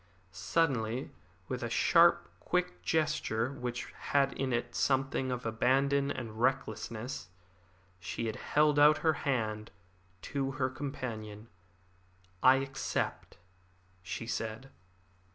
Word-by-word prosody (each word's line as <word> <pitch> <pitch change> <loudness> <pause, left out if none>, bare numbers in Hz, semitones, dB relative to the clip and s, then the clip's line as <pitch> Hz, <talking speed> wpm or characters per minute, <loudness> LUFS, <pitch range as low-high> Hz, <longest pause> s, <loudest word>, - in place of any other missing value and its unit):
Suddenly, 120 - 0 0.4
with - - -3
a - - -2
sharp, - - +5
quick 90 0 -1
gesture 135 - 0
which 125 -3 -5
had 140 -1 +1
in 135 -1 -2
it 120 0 -1
something 135 -1 +1
of 125 0 -4
abandon 135 +5 +2
and 115 -3 -5
recklessness, 115 -3 -2 0.7
she 90 +5 -4
held 150 +3 +2
out 150 +1 +7
her 160 - +5 0.2
hand 110 -4 -1 0.5
to 135 -1 -2
her 130 -2 -1
companion. 115 -6 -6 0.9
"I 130 - +7
accept," 135 0 -3 0.6
she 95 +5 -5
said. 115 +3 -4
130 Hz, 105 wpm, -32 LUFS, 110-140 Hz, 0.9 s, out